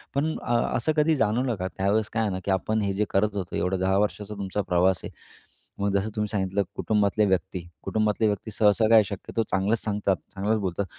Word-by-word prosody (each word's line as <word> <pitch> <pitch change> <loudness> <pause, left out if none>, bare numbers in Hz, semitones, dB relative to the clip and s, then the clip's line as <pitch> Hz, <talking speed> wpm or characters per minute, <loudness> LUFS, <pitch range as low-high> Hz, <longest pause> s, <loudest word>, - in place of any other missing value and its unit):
पण 155 +3 0
अ, 120 - -2 0.2
असं 125 +6 0
कधी 155 +1 +4
जाणवलं 120 0 +1
का 95 -1 -3
त्यावेळेस 100 +3 +1
काय 115 - +1
आहे 105 - 0
ना 95 - -3
की 100 - 0
आपण 110 +3 0
हे 100 -1 0
जे 105 +2 0
करत 105 +1 +1
होतो 95 -3 -4
एवढं 95 +1 0
10 95 +1 +2
वर्षाचा 105 0 -1
तुमचा 100 0 -2
प्रवास 90 -1 +2
आहे, - - -6 0.7
मग 100 0 +1
जसं 100 +2 +1
तुम्ही 105 -1 0
सांगितलं 100 -1 0
कुटुंबातल्या 105 0 +2
व्यक्ती 95 -1 0 0.2
कुटुंबातले 110 0 +1
व्यक्ती 105 +1 -2
सहसा 105 +1 +3
काय 115 - +3
आहे 110 - +7
शक्यतो 100 +3 -3
चांगलंच 100 +4 +1
सांगतात, 105 -2 0 0.2
चांगलंच 105 +3 0
बोलतात 95 0 -2
105 Hz, 210 wpm, -26 LUFS, 95-110 Hz, 0.7 s, आहे